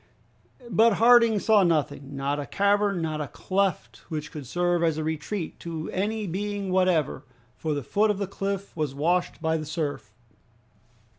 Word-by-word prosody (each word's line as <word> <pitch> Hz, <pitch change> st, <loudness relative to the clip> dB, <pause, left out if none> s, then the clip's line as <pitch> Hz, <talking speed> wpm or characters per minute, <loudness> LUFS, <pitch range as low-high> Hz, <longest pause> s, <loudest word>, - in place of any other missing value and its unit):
But 225 Hz, +4 st, +5 dB
Harding 230 Hz, 0 st, +6 dB
saw 215 Hz, 0 st, +4 dB
nothing, 150 Hz, -5 st, 0 dB
not 140 Hz, +2 st, -1 dB
a 145 Hz, -, -5 dB
cavern, 200 Hz, -2 st, +1 dB
not 155 Hz, -1 st, -2 dB
a 145 Hz, -, -3 dB
cleft 185 Hz, -, -1 dB
which 155 Hz, -2 st, -4 dB
could 145 Hz, -5 st, -8 dB
serve 175 Hz, +4 st, +1 dB
as 165 Hz, -2 st, +1 dB
a 155 Hz, -, -2 dB
retreat 160 Hz, +3 st, -4 dB
to 165 Hz, -2 st, -5 dB
any 210 Hz, +3 st, -1 dB
being 200 Hz, +1 st, -3 dB
whatever, 180 Hz, -7 st, +1 dB, 0.3 s
for 155 Hz, -2 st, -2 dB
the 145 Hz, -, -3 dB
foot 210 Hz, -, +2 dB
of 210 Hz, -, +1 dB
the 200 Hz, -, -1 dB
cliff 195 Hz, 0 st, -4 dB
was 150 Hz, -4 st, -2 dB
washed 175 Hz, +3 st, 0 dB
by 160 Hz, 0 st, +1 dB
the 155 Hz, -, -5 dB
surf. 145 Hz, -, -3 dB
175 Hz, 165 wpm, -26 LUFS, 155-200 Hz, 0.3 s, Harding